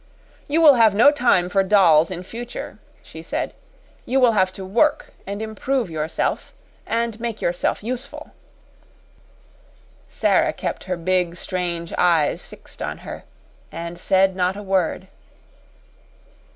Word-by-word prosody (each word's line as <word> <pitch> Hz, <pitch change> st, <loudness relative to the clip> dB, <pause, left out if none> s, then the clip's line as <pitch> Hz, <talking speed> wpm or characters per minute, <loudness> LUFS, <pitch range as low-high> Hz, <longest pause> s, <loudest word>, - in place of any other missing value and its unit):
"You 315 Hz, +3 st, +1 dB
will 300 Hz, -3 st, +8 dB
have 225 Hz, -5 st, +4 dB
no 240 Hz, +7 st, +7 dB
time 245 Hz, -11 st, +2 dB
for 195 Hz, +2 st, +2 dB
dolls 185 Hz, -5 st, +4 dB
in 180 Hz, -1 st, -6 dB
future," 235 Hz, +5 st, -8 dB, 0.2 s
she -, -, -11 dB
said. -, -, -4 dB, 0.5 s
"You 265 Hz, +2 st, 0 dB
will 250 Hz, -2 st, +5 dB
have 190 Hz, -4 st, +2 dB
to 190 Hz, -, -8 dB
work 265 Hz, +10 st, +1 dB
and 200 Hz, +2 st, -4 dB
improve 220 Hz, 0 st, -2 dB
yourself 155 Hz, 0 st, -2 dB, 0.3 s
and 230 Hz, -1 st, -1 dB
make 230 Hz, -2 st, -4 dB
yourself 175 Hz, +3 st, -1 dB
useful." 255 Hz, +4 st, -6 dB, 1.8 s
Sara -, -, +1 dB
kept -, -, -5 dB
her 180 Hz, -1 st, -3 dB
big, 180 Hz, 0 st, 0 dB
strange 175 Hz, -2 st, -3 dB
eyes 165 Hz, -4 st, +2 dB
fixed -, -, -13 dB
on -, -, -5 dB
her, -, -, -8 dB, 0.5 s
and 170 Hz, +1 st, -7 dB
said 190 Hz, +1 st, +2 dB
not 185 Hz, +1 st, 0 dB
a 205 Hz, -, -7 dB
word. 190 Hz, -1 st, -1 dB
190 Hz, 135 wpm, -22 LUFS, 175-230 Hz, 1.8 s, will